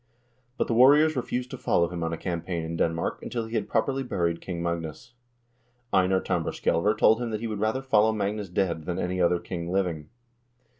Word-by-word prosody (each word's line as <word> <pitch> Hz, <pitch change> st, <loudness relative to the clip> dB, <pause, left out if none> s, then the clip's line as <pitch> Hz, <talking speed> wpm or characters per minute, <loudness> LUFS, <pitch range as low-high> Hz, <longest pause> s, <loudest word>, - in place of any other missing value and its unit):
But -, -, +1 dB
the -, -, -1 dB
warriors 145 Hz, +6 st, +6 dB
refused 125 Hz, 0 st, -3 dB
to -, -, -7 dB
follow 85 Hz, -, +2 dB
him 90 Hz, -1 st, -5 dB
on 80 Hz, -, -1 dB
a 85 Hz, -, -3 dB
campaign 85 Hz, -1 st, -3 dB
in 80 Hz, +1 st, -4 dB
Denmark 85 Hz, 0 st, -1 dB
until 115 Hz, -2 st, -3 dB
he 110 Hz, -, -10 dB
had 105 Hz, -3 st, -1 dB
properly 135 Hz, 0 st, 0 dB
buried 85 Hz, -9 st, -1 dB
King 85 Hz, -2 st, -5 dB
Magnus. 85 Hz, +5 st, -4 dB, 0.8 s
Einar 95 Hz, 0 st, +3 dB
Tambarskjselver 105 Hz, +5 st, 0 dB
told 110 Hz, +2 st, +4 dB
him 120 Hz, -, -2 dB
that 110 Hz, -1 st, -3 dB
he -, -, -3 dB
would 110 Hz, -2 st, -3 dB
rather 110 Hz, +5 st, 0 dB
follow 110 Hz, -4 st, +4 dB
Magnus 105 Hz, -1 st, -2 dB
dead 85 Hz, -3 st, -1 dB
than 90 Hz, 0 st, -3 dB
any 90 Hz, +1 st, -1 dB
other 90 Hz, 0 st, +3 dB
king 85 Hz, 0 st, -5 dB
living. 85 Hz, -6 st, -1 dB
95 Hz, 195 wpm, -26 LUFS, 85-110 Hz, 0.8 s, warriors